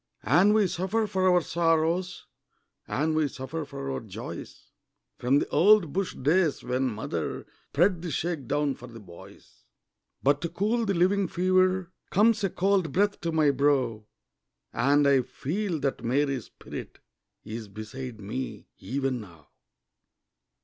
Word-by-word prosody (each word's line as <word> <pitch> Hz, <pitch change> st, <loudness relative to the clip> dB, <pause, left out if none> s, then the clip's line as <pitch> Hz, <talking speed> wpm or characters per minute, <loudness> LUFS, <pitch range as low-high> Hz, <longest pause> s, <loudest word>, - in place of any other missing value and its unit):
And 205 Hz, +4 st, +5 dB
we 215 Hz, -2 st, +4 dB
suffer 190 Hz, +5 st, 0 dB
for 185 Hz, -2 st, +1 dB
our 180 Hz, -1 st, +4 dB
sorrows, 170 Hz, +2 st, 0 dB, 0.6 s
And 155 Hz, +3 st, 0 dB
we 155 Hz, -1 st, +2 dB
suffer 135 Hz, +5 st, -5 dB
for 135 Hz, -1 st, -6 dB
our 135 Hz, -, -2 dB
joys, 110 Hz, -5 st, -9 dB, 0.5 s
From 125 Hz, +3 st, +3 dB
the -, -, 0 dB
old 175 Hz, 0 st, +5 dB
bush 195 Hz, -1 st, -2 dB
days 155 Hz, +3 st, +1 dB
when 130 Hz, +1 st, 0 dB
mother 110 Hz, -2 st, -4 dB, 0.2 s
Spread 175 Hz, +2 st, +2 dB
the 175 Hz, -, -4 dB
shake 160 Hz, -2 st, -2 dB
down 145 Hz, 0 st, +1 dB
for 125 Hz, -1 st, -11 dB
the 115 Hz, -1 st, -11 dB
boys. 90 Hz, -5 st, -15 dB, 0.6 s
But 145 Hz, +1 st, +3 dB
to 170 Hz, -, -2 dB
cool 215 Hz, +6 st, 0 dB
the 195 Hz, -, +1 dB
living 190 Hz, +3 st, +2 dB
fever, 185 Hz, +1 st, +2 dB, 0.2 s
Comes 220 Hz, +2 st, +3 dB
a 195 Hz, -, +2 dB
cold 190 Hz, -3 st, +1 dB
breath 205 Hz, +4 st, +1 dB
to 170 Hz, -, -1 dB
my 155 Hz, -3 st, +3 dB
brow, 130 Hz, -6 st, +1 dB, 0.7 s
And 145 Hz, +3 st, +3 dB
I 135 Hz, -2 st, +5 dB
feel 165 Hz, -, -3 dB
that 140 Hz, -1 st, -2 dB
Mary's 135 Hz, 0 st, 0 dB
spirit -, -, -9 dB, 0.5 s
Is 110 Hz, 0 st, -6 dB
beside 110 Hz, +4 st, -8 dB
me, 110 Hz, +6 st, -6 dB
even 135 Hz, -1 st, -2 dB
now. 85 Hz, -7 st, -15 dB
155 Hz, 145 wpm, -27 LUFS, 130-185 Hz, 0.7 s, And